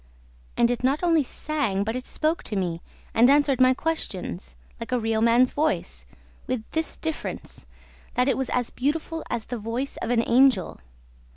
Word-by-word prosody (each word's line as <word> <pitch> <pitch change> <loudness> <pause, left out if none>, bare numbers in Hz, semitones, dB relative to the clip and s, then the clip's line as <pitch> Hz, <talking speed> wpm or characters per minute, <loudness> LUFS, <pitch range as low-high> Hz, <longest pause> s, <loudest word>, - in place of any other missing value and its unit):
And 235 0 +4
it 245 0 -3
not 275 +6 +1
only 330 -3 +4
sang, 270 -8 -2
but 225 +3 -3
it 255 - -5
spoke 315 +2 0
to 215 - -3
me 175 -3 -2 0.3
and 240 +3 +5
answered 280 -2 +4
my 255 0 +6
questions, 180 - -3 0.2
like 230 +2 -7
a 250 - +2
real 225 -1 0
man's 235 +2 +4
voice, 310 +2 -2 0.4
with 250 -3 -2
this 320 0 -2
difference, 320 -1 -5 0.5
that 250 +1 +2
it 270 - +3
was 265 -1 -2
as 245 -2 -1
beautiful 315 +4 -2
as 235 -2 -3
the 245 -1 -5
voice 235 +6 -4
of - - -4
an 235 -1 +3
angel. 250 -4 +3
250 Hz, 175 wpm, -25 LUFS, 225-290 Hz, 0.5 s, my